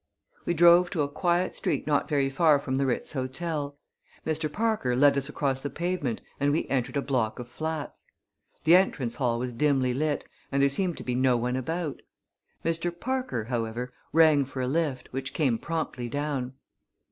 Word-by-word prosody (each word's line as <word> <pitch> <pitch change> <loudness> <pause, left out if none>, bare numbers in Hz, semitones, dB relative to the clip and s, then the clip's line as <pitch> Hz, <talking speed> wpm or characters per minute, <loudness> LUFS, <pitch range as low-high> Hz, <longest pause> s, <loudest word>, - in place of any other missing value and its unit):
We 175 - 0
drove 175 +2 +7
to 165 -6 0
a - - 0
quiet 175 +4 0
street - - -1
not 145 -2 +1
very 140 -3 +2
far 150 +1 +5
from 130 -2 -2
the 135 0 +1
Ritz 125 - -1
Hotel. 145 +2 -3 0.5
Mr. 155 -1 -1
Parker 215 - 0
led 140 +2 +5
us 140 +1 -2
across 135 -3 -1
the 145 - -3
pavement 170 -8 -2 0.2
and 145 0 +2
we 155 - 0
entered 130 +1 0
a 140 - 0
block 120 -6 0
of 125 -1 -7
flats. 155 +4 -5 0.6
The 160 +3 +7
entrance 145 -10 +2
hall 120 -3 +1
was 125 +1 -3
dimly 130 -1 +2
lit 150 +2 -1 0.3
and 140 - +1
there 140 0 +5
seemed 175 +3 -1
to - - -7
be 125 - -2
no 125 0 +3
one 125 +2 -1
about. 160 +3 -3 0.6
Mr. 165 +1 -1
Parker, 260 - -2
however, 120 +1 -3 0.2
rang 155 -3 +5
for 135 0 -7
a - - -1
lift, 140 -3 -1
which 135 +1 -4
came 130 -8 +2
promptly 145 -4 -3
down. 140 -2 -2
140 Hz, 180 wpm, -27 LUFS, 130-160 Hz, 0.6 s, drove